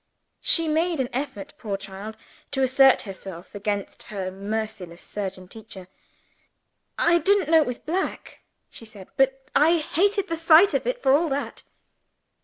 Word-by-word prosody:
She 330 Hz, -1 st, +3 dB
made 325 Hz, +1 st, 0 dB
an 255 Hz, -2 st, -2 dB
effort, 250 Hz, -7 st, -5 dB
poor 200 Hz, -3 st, -3 dB
child, 200 Hz, +2 st, -9 dB, 0.3 s
to 270 Hz, -1 st, -1 dB
assert 265 Hz, +1 st, +5 dB
herself, 190 Hz, -3 st, -9 dB
against 205 Hz, 0 st, -4 dB
her 190 Hz, -3 st, -4 dB
merciless 200 Hz, -3 st, -5 dB
surgeon 190 Hz, -2 st, -6 dB
teacher. 195 Hz, -3 st, -12 dB, 1.1 s
"I 345 Hz, 0 st, +3 dB
didn't 390 Hz, -4 st, +2 dB
know 325 Hz, -1 st, +7 dB
it -, -, -1 dB
was 250 Hz, -1 st, -3 dB
black," 360 Hz, +5 st, -4 dB, 0.3 s
she -, -, -11 dB
said. 215 Hz, -4 st, -12 dB
"But 270 Hz, 0 st, 0 dB
I 320 Hz, +4 st, +5 dB
hated 395 Hz, +6 st, 0 dB
the 330 Hz, -, -3 dB
sight 330 Hz, +4 st, +6 dB
of -, -, -1 dB
it, -, -, -2 dB
for 265 Hz, -, +4 dB
all 320 Hz, +3 st, +2 dB
that." 280 Hz, +1 st, -4 dB
260 Hz, 155 wpm, -24 LUFS, 200-325 Hz, 1.1 s, know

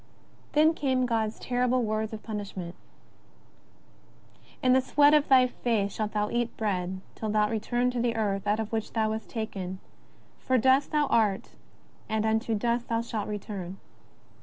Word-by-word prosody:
(Then 310 Hz, +2 st, +5 dB
came 260 Hz, -5 st, +1 dB
God's 225 Hz, -2 st, -1 dB
terrible 250 Hz, 0 st, 0 dB
words 215 Hz, 0 st, -1 dB
of 220 Hz, -1 st, -7 dB
punishment; 200 Hz, -5 st, -5 dB, 1.0 s
" -, -, -29 dB
In 255 Hz, 0 st, +5 dB
the 260 Hz, -, +5 dB
sweat 290 Hz, +3 st, +4 dB
of 300 Hz, -1 st, +3 dB
thy 260 Hz, -2 st, +7 dB
face 225 Hz, -5 st, -1 dB
shalt 215 Hz, -1 st, -3 dB
thou 210 Hz, 0 st, 0 dB
eat 240 Hz, 0 st, -1 dB
bread 190 Hz, -3 st, -2 dB
till 220 Hz, -, -4 dB
thou 210 Hz, 0 st, +2 dB
return 240 Hz, +3 st, 0 dB
to 245 Hz, -1 st, -2 dB
the 235 Hz, -1 st, 0 dB
earth 205 Hz, -2 st, -1 dB
out 210 Hz, +2 st, +2 dB
of 220 Hz, -1 st, -3 dB
which 220 Hz, -1 st, -3 dB
thou 220 Hz, -1 st, +1 dB
wast 220 Hz, 0 st, -5 dB
taken: 195 Hz, -5 st, -5 dB, 0.6 s
for 260 Hz, -, +1 dB
dust 260 Hz, +3 st, +3 dB
thou 300 Hz, -1 st, +2 dB
art 215 Hz, -7 st, +1 dB, 0.6 s
and 220 Hz, 0 st, 0 dB
unto 220 Hz, +1 st, +1 dB
dust 235 Hz, +2 st, 0 dB
thou 230 Hz, 0 st, 0 dB
shalt 225 Hz, -3 st, -4 dB
return." 195 Hz, -3 st, -5 dB
220 Hz, 165 wpm, -28 LUFS, 210-250 Hz, 1.0 s, thy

